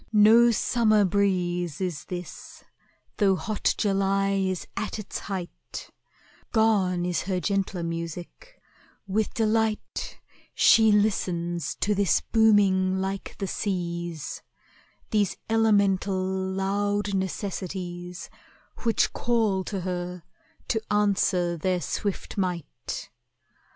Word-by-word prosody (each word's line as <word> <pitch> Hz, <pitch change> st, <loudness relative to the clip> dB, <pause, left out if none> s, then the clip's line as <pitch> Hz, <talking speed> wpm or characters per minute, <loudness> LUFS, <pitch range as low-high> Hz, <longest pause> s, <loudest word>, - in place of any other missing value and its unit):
No 225 Hz, +3 st, +7 dB
summer 215 Hz, -2 st, +3 dB
breeze 180 Hz, -4 st, 0 dB
Is 180 Hz, -5 st, -3 dB
this, 180 Hz, -2 st, -8 dB, 0.5 s
though 195 Hz, -3 st, +4 dB
hot 215 Hz, +3 st, -1 dB
July 195 Hz, -1 st, +1 dB
is 190 Hz, -2 st, -1 dB
at 215 Hz, -, -3 dB
its 210 Hz, -2 st, -5 dB
height, 190 Hz, -3 st, -7 dB, 0.6 s
Gone 195 Hz, -6 st, +2 dB
is 180 Hz, -1 st, 0 dB
her 185 Hz, -1 st, -1 dB
gentler 195 Hz, -1 st, -1 dB
music; 170 Hz, -, -6 dB, 0.5 s
with 205 Hz, +2 st, 0 dB
delight 220 Hz, -1 st, 0 dB, 0.4 s
She 220 Hz, -1 st, +6 dB
listens 175 Hz, -6 st, 0 dB
to 210 Hz, -, +2 dB
this 200 Hz, -2 st, +3 dB
booming 195 Hz, -4 st, +3 dB
like 195 Hz, +1 st, -4 dB
the 195 Hz, -, -2 dB
seas, 175 Hz, -5 st, -3 dB, 0.7 s
These 205 Hz, -3 st, +1 dB
elemental, 200 Hz, -3 st, +3 dB
loud 195 Hz, +2 st, -1 dB
necessities 185 Hz, -2 st, -4 dB, 0.5 s
Which 230 Hz, -2 st, +1 dB
call 220 Hz, -6 st, +1 dB
to 195 Hz, -3 st, -3 dB
her 180 Hz, -1 st, -4 dB, 0.5 s
to 220 Hz, -, +1 dB
answer 195 Hz, -4 st, +2 dB
their 180 Hz, +3 st, 0 dB
swift 200 Hz, +3 st, -3 dB
might. 180 Hz, -4 st, -4 dB
195 Hz, 100 wpm, -26 LUFS, 180-210 Hz, 0.7 s, No